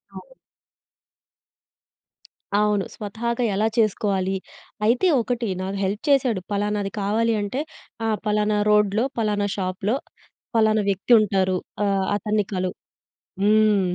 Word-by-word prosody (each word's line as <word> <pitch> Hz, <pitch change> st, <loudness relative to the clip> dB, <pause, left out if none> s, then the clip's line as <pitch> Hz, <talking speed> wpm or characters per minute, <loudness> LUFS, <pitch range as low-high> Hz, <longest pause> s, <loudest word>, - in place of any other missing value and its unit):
అవును. -, -, -11 dB, 2.3 s
అవును. 210 Hz, -2 st, +2 dB
స్వతహాగా 235 Hz, +4 st, -3 dB
ఎలా 215 Hz, +3 st, +2 dB
చేసుకోవాలి? 200 Hz, -3 st, +1 dB, 0.5 s
అయితే 245 Hz, +11 st, +3 dB
ఒకటి, 240 Hz, 0 st, -2 dB
నాకు 190 Hz, +1 st, -3 dB
హెల్ప్ 200 Hz, +2 st, -2 dB
చేసాడు, 250 Hz, -8 st, +3 dB
పలానాది 205 Hz, 0 st, -1 dB
కావాలి 225 Hz, +3 st, +1 dB
అంటే, 205 Hz, +8 st, -2 dB, 0.4 s
ఆహ్, 220 Hz, -1 st, +1 dB
పలానా 210 Hz, 0 st, +1 dB
రోడ్‌లో, 210 Hz, +2 st, +3 dB
పలానా 205 Hz, -2 st, 0 dB
షాపులో, 190 Hz, +3 st, -1 dB, 0.6 s
పలానా 220 Hz, -1 st, +3 dB
వ్యక్తుంటారు, 195 Hz, -2 st, +3 dB, 0.3 s
ఆహ్, 195 Hz, -1 st, +1 dB
అతన్ని 210 Hz, 0 st, 0 dB
కలువు. 185 Hz, 0 st, -2 dB, 0.7 s
హ్మ్. 215 Hz, 0 st, +4 dB
210 Hz, 105 wpm, -23 LUFS, 195-220 Hz, 2.3 s, హ్మ్